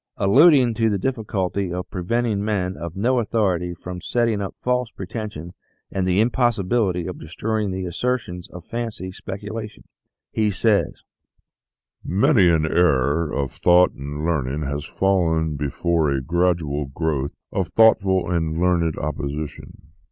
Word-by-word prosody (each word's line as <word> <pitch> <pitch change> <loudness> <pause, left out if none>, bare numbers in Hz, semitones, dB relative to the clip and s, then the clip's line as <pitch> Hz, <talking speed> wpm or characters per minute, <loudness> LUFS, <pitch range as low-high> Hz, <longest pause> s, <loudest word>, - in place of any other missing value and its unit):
Alluding 130 - +5
to 115 0 +1
the 105 - 0
difficulty 100 -5 -2
of 90 0 -5
preventing 105 +3 -1
men 95 -3 -1
of 85 +2 -7
no 120 +6 +2
authority 95 -6 0
from 90 +1 -8
setting 115 -4 0
up 100 - -5
false 125 -1 0
pretensions 95 -5 -7 0.4
and 95 -1 -1
the 90 +1 +2
impossibility 110 -6 +1
of 90 - -6
destroying 105 +6 -2
the 95 0 -3
assertions 90 -2 -3
of 90 -1 -11
fancy 115 -5 -4
specula 105 +4 -6
tion, 105 - -18 0.5
he 110 -1 +1
says: 105 +1 +1 0.6
" - - -54 0.2
Many 120 - +5
an 80 -2 +3
error 75 -1 +2
of 70 -2 -2
thought 90 0 +4
and 75 +2 -6
learning 75 -3 -1
has 70 +1 -3
fallen 80 -5 +1
before 75 +3 0
a 70 -1 +1
gradual 80 -1 0
growth 70 -1 -2 0.2
of 95 -2 -1
thoughtful 100 -4 +4
and 80 -2 -1
learned 85 -3 +1
opposition. 75 0 -5
90 Hz, 140 wpm, -22 LUFS, 80-110 Hz, 0.6 s, Alluding